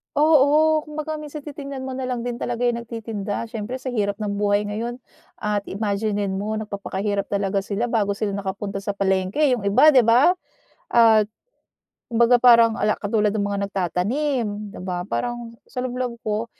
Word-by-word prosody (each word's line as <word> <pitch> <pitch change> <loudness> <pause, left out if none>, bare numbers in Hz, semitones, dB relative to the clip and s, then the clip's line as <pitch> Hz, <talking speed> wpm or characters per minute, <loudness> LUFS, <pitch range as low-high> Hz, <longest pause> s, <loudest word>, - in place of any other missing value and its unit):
Oo, 305 +1 +5
kumbaga, 305 +1 -4
minsan 300 -1 -8
titingnan 280 -2 -7
mo 265 - -5
na 260 0 -4
lang 245 -2 -3
din 245 -1 -4
talaga 245 0 -2
'yong 240 -1 +1
nagtitinda. 220 -3 -4
Siyempre, 225 +2 -5
sa 255 0 -5
hirap 205 -3 0
ng 205 -1 -2
buhay 205 0 +2
ngayon, 225 +4 -4 0.5
at 210 -1 -1
imaginin 205 -1 -1
mo, 215 +2 -2
nagpapakahirap 200 -1 -3
talaga 200 -1 0
sila 205 +4 -2
bago 205 -3 +1
sila 205 0 -2
nakapunta 195 0 -4
sa 195 0 -4
palengke, 190 +6 0
eh, 290 - +5
'yong 205 -5 -2
iba, 300 +10 +6
'di 260 - +6
ba? 250 +9 +6 0.6
Ah, 225 -2 +6 0.9
kumbaga, 235 +1 +5
parang 235 -2 +6
ala 215 - +2
katulad 210 0 +1
ng 205 -2 0
mga 200 0 -2
nagtatanim, 220 - -1 0.3
'di - - -8
ba, 180 -1 -3
parang 240 0 -3
sa 250 - -7
loob-loob 250 -1 -3
ko, 215 +1 -2
220 Hz, 170 wpm, -23 LUFS, 200-250 Hz, 0.9 s, iba